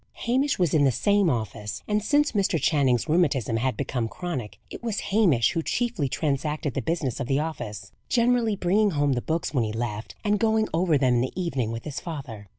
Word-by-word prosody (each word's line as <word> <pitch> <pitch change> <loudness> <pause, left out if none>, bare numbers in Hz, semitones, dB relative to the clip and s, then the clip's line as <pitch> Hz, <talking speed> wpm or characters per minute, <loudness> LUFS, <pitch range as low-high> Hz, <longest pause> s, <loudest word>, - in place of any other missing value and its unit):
Hamish 265 +4 +1
was 175 -5 +1
in 155 -3 +4
the 135 - +4
same 200 - +2
office; 110 -4 -3
and 210 0 0
since 295 +5 +3
Mr. 195 -6 +1
Channing's 135 -4 +2
rheumatism 145 -8 +2
had 130 +3 -1
become 125 -4 -2
chronic, 130 - -5
it - - -8
was 225 -3 -2
Hamish 170 - +4
who 165 - -1
chiefly 230 - -1
transacted 150 0 -1
the - - -2
business 160 -7 -2
of 130 - -3
the 135 - +1
office, 110 -11 -4 0.2
generally 235 -2 +2
bringing 200 +3 +2
home 145 -5 +1
the 120 - -1
books 160 +4 -2
when 125 -5 +2
he 110 - -2
left, 110 -1 -4
and 210 -1 +1
going 220 -1 +2
over 165 -2 +3
them 130 -2 +2
in - - +2
the 130 +8 -3
evening 135 -11 -1
with 115 0 -5
his 145 -2 -5
father. 135 - -7
150 Hz, 205 wpm, -25 LUFS, 125-200 Hz, 0.2 s, in